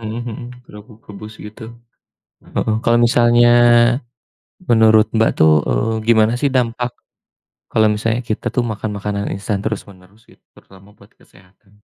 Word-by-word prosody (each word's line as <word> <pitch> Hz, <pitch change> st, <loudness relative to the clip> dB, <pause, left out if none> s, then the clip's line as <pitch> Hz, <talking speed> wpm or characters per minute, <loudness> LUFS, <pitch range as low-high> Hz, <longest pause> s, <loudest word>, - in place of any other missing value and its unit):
Mhm 110 Hz, +1 st, -6 dB
mhm, 115 Hz, -3 st, -6 dB, 0.3 s
kerupuk 105 Hz, 0 st, -16 dB
rebus 105 Hz, +1 st, -11 dB
gitu. 110 Hz, +2 st, -11 dB, 0.6 s
Heeh, 110 Hz, -, -3 dB
kalau 120 Hz, -, +2 dB
misalnya 120 Hz, 0 st, +4 dB, 1.1 s
menurut 110 Hz, -4 st, +3 dB
Mbak 110 Hz, 0 st, +2 dB
tuh, 80 Hz, 0 st, +4 dB, 0.2 s
eee, 115 Hz, +1 st, -1 dB
gimana 110 Hz, -1 st, +4 dB
sih 145 Hz, -, +1 dB
dampak 125 Hz, -1 st, -2 dB, 0.8 s
kalau 110 Hz, -1 st, +3 dB
misalnya 110 Hz, +3 st, -2 dB
kita 110 Hz, -, -4 dB
tuh 125 Hz, -, +1 dB
makan 110 Hz, -1 st, -5 dB
makanan 100 Hz, 0 st, -4 dB
instan 100 Hz, +1 st, -3 dB
terus-menerus 100 Hz, 0 st, -8 dB
gitu -, -, -24 dB
terutama 100 Hz, +2 st, -19 dB
buat 100 Hz, +1 st, -21 dB
kesehatan? 100 Hz, +3 st, -25 dB
110 Hz, 135 wpm, -17 LUFS, 105-115 Hz, 1.1 s, misalnya